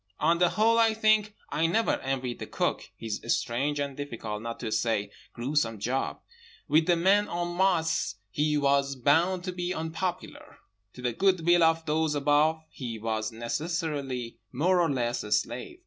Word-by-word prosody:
On 170 Hz, +2 st, +3 dB
the 175 Hz, -1 st, +4 dB
whole, 225 Hz, +4 st, +3 dB
I 225 Hz, -1 st, +4 dB
think 215 Hz, -1 st, +3 dB, 0.2 s
I 165 Hz, +2 st, +2 dB
never 220 Hz, +7 st, +1 dB
envied 130 Hz, -2 st, -3 dB
the -, -, -6 dB
Cook -, -, -2 dB
his 110 Hz, -2 st, -4 dB
strange 135 Hz, +5 st, 0 dB
and 140 Hz, -1 st, -3 dB
difficult, 115 Hz, -7 st, -5 dB
not 115 Hz, 0 st, -6 dB
to 115 Hz, -3 st, -3 dB
say 110 Hz, -2 st, 0 dB, 0.2 s
gruesome, 120 Hz, -2 st, -1 dB
job. 125 Hz, +6 st, -2 dB, 0.5 s
With 155 Hz, +2 st, +3 dB
the 175 Hz, -, +5 dB
men 195 Hz, +5 st, +3 dB
en 175 Hz, 0 st, -3 dB
masse 165 Hz, -, +1 dB, 0.2 s
he 150 Hz, +3 st, +1 dB
was 140 Hz, -1 st, +2 dB
bound 165 Hz, +8 st, +2 dB
to 185 Hz, -, -3 dB
be 180 Hz, 0 st, -3 dB
unpopular. 165 Hz, +3 st, -5 dB, 0.4 s
To 125 Hz, -, -11 dB
the 120 Hz, -1 st, 0 dB
good 185 Hz, +3 st, +2 dB
will 175 Hz, 0 st, +5 dB
of 165 Hz, 0 st, +3 dB
those 155 Hz, 0 st, +1 dB
above 150 Hz, +2 st, +2 dB
he 120 Hz, -6 st, -6 dB
was 110 Hz, 0 st, -2 dB
necessarily 135 Hz, 0 st, -3 dB
more 175 Hz, +7 st, +2 dB
or 165 Hz, -, +2 dB
less 120 Hz, -3 st, -1 dB
a 105 Hz, -, -8 dB
slave. 120 Hz, -, -1 dB
150 Hz, 170 wpm, -28 LUFS, 120-175 Hz, 0.5 s, the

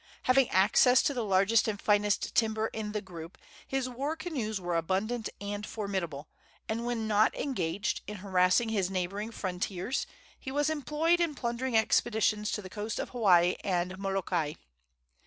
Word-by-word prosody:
Having 255 Hz, 0 st, +4 dB
access 230 Hz, +7 st, +5 dB
to 285 Hz, -, +1 dB
the 245 Hz, -3 st, -2 dB
largest 200 Hz, +3 st, +3 dB
and 210 Hz, -2 st, -2 dB
finest 205 Hz, 0 st, +1 dB
timber 220 Hz, -1 st, +1 dB
in 215 Hz, -1 st, -4 dB
the 210 Hz, -1 st, -2 dB
group, 170 Hz, -2 st, -10 dB, 0.3 s
his 270 Hz, -1 st, -1 dB
war 275 Hz, +5 st, -3 dB
canoes 265 Hz, -, -3 dB
were 175 Hz, -1 st, -2 dB
abundant 195 Hz, +8 st, -1 dB
and 205 Hz, 0 st, -4 dB
formidable, 190 Hz, -10 st, -4 dB, 0.4 s
and 230 Hz, +2 st, -2 dB
when 230 Hz, -2 st, -2 dB
not 215 Hz, 0 st, +3 dB
engaged 200 Hz, -, -2 dB
in 210 Hz, -, -5 dB
harassing 185 Hz, +3 st, +2 dB
his 200 Hz, -4 st, 0 dB
neighboring 195 Hz, +3 st, -3 dB
frontiers 190 Hz, +3 st, -3 dB, 0.3 s
he -, -, -7 dB
was 290 Hz, +3 st, +1 dB
employed 315 Hz, +3 st, +1 dB
in 335 Hz, -4 st, 0 dB
plundering 240 Hz, -1 st, -1 dB
expeditions 220 Hz, -1 st, +2 dB
to 210 Hz, -, -3 dB
the -, -, -7 dB
coasts 210 Hz, +3 st, -4 dB
of -, -, -3 dB
Hawaii 180 Hz, -7 st, +4 dB
and 180 Hz, -1 st, -1 dB
Molokai. 190 Hz, -6 st, -1 dB
210 Hz, 155 wpm, -30 LUFS, 190-240 Hz, 0.4 s, access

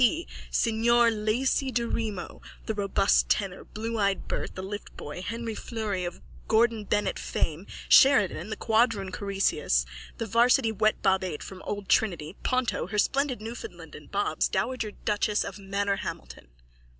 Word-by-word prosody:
P., 320 Hz, +8 st, +3 dB, 0.2 s
signor 235 Hz, +1 st, +3 dB
Laci 235 Hz, +5 st, 0 dB
Daremo, 230 Hz, -4 st, -3 dB, 0.2 s
the 220 Hz, -, -1 dB
robust 200 Hz, -1 st, +2 dB
tenor, 195 Hz, -3 st, 0 dB
blueeyed 215 Hz, -3 st, -1 dB
Bert, -, -, -3 dB
the 185 Hz, -, -5 dB
liftboy, 190 Hz, -5 st, -7 dB
Henri 230 Hz, +4 st, -4 dB
Fleury 210 Hz, -5 st, -3 dB
of 175 Hz, -, -6 dB, 0.3 s
Gordon 225 Hz, -1 st, +3 dB
Bennett 210 Hz, +1 st, 0 dB
fame, 165 Hz, +5 st, -2 dB, 0.2 s
Sheridan, 210 Hz, -, +5 dB
the 220 Hz, -, -3 dB
quadroon 220 Hz, -4 st, +2 dB
Croesus, 195 Hz, -, +1 dB, 0.3 s
the 230 Hz, -, -2 dB
varsity 235 Hz, +1 st, +4 dB
wetbob 200 Hz, -3 st, +2 dB
eight 170 Hz, -5 st, -4 dB
from 190 Hz, -1 st, -9 dB
old 205 Hz, -1 st, -4 dB
Trinity, 175 Hz, -5 st, +1 dB
Ponto, 255 Hz, -6 st, 0 dB
her 210 Hz, +3 st, -4 dB
splendid 270 Hz, +2 st, +1 dB
Newfoundland 235 Hz, -, -8 dB
and -, -, -12 dB
Bobs, -, -, 0 dB
dowager 255 Hz, -4 st, -1 dB
duchess 210 Hz, 0 st, 0 dB
of -, -, -6 dB
Manorhamilton. 195 Hz, -, -3 dB
215 Hz, 135 wpm, -27 LUFS, 195-230 Hz, 0.3 s, Sheridan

